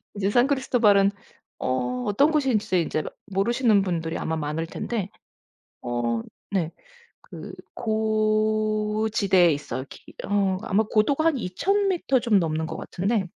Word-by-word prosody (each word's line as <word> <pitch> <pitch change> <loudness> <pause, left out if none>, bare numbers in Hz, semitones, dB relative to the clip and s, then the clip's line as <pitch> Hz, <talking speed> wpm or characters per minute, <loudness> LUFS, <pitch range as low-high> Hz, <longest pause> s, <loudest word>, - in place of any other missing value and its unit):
이제 200 0 0
산크리스토발은 240 -5 +3 0.5
어 125 -1 -1
어떤 280 +10 +3
곳인지 230 - +1
인제를 155 -1 -2 0.2
모르시는 210 +2 +2
분들이 165 -3 -2
아마 160 - -2
많을 155 +2 -2
텐데 205 +1 -4 0.7
어 120 -1 -1 0.3
네 175 -5 0 0.6
그 - - -8 0.2
고 215 -1 0
지대에 190 -5 +4
있어요. 130 -3 -4
기 - - -14
어 195 -2 +1
아마 215 +3 +1
고도가 275 +9 +2
한 320 -4 +3
2,000 390 - 0
미터 275 -8 +1
좀 225 -5 +3
넘는 160 -2 -1
것 - - -6
같은데 195 +1 -1
205 Hz, 260 characters per minute, -25 LUFS, 170-225 Hz, 0.7 s, 지대에